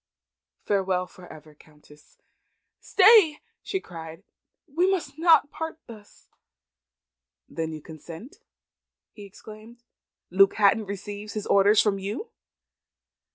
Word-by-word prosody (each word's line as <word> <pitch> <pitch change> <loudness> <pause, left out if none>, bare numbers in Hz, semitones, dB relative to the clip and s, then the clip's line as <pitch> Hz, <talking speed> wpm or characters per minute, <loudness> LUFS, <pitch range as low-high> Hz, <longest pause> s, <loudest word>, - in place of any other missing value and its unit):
Farewell 190 -2 0
for 180 0 -15
ever, 155 -1 -14
Countess!" 150 0 -22 0.6
"Stay!" 390 -6 +5 0.2
she 385 - -3
cried. 165 - -11 0.4
"We 345 +4 0
must 360 -5 -3
not 325 -3 +4
part 320 0 -6
thus." 215 -3 -16 1.2
"Then 160 -1 -5
you 155 -2 -9
consent?" 165 - -12 0.7
he 205 - -12
exclaimed. 215 +4 -14 0.5
"Luke 195 +2 +4
Hatton 210 0 +2
receives 205 +1 -7
his 210 -2 -5
orders 200 +2 +4
from 200 -2 0
you?" 220 - -6
205 Hz, 110 wpm, -25 LUFS, 180-275 Hz, 1.2 s, Stay